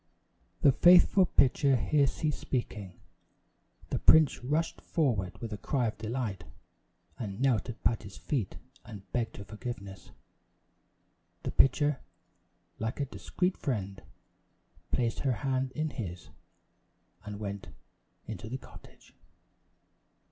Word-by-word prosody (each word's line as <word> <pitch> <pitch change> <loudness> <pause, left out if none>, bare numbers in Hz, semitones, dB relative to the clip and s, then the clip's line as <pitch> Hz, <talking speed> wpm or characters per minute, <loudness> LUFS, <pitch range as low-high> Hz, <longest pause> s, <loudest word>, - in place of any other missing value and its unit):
The 140 - +8
faithful 180 +4 +6
pitcher 140 0 +4
here 140 +3 +3
ceased 150 +3 -2
speaking. 105 -8 -4 0.9
The - - 0
prince 155 -5 +5
rushed 155 +6 -1
forward 105 - 0
with 110 0 -5
a 105 - -6
cry 130 +1 0
of 110 -2 -3
delight, 110 -5 -3 0.8
and 100 -3 -5
knelt 125 -3 +2
at 120 - -8
Patty's 100 -1 -1
feet 120 -11 -2 0.3
and 105 -4 -10
begged 120 -2 -2
her 100 - -7
forgiveness. 100 -3 -7 1.3
The - - -2
pitcher, 145 +1 +3 0.8
like 110 +4 -3
a 140 - +1
discreet 180 +7 -2
friend, 100 -7 -3 0.9
placed 115 -2 0
her 135 -2 +1
hand 130 -1 0
in 155 +1 -2
his, 90 -9 -6 0.9
and 105 -1 -7
went 100 -2 -5 0.6
into 110 - -6
the 130 - -3
cottage. - - -16
120 Hz, 120 wpm, -30 LUFS, 105-140 Hz, 1.3 s, The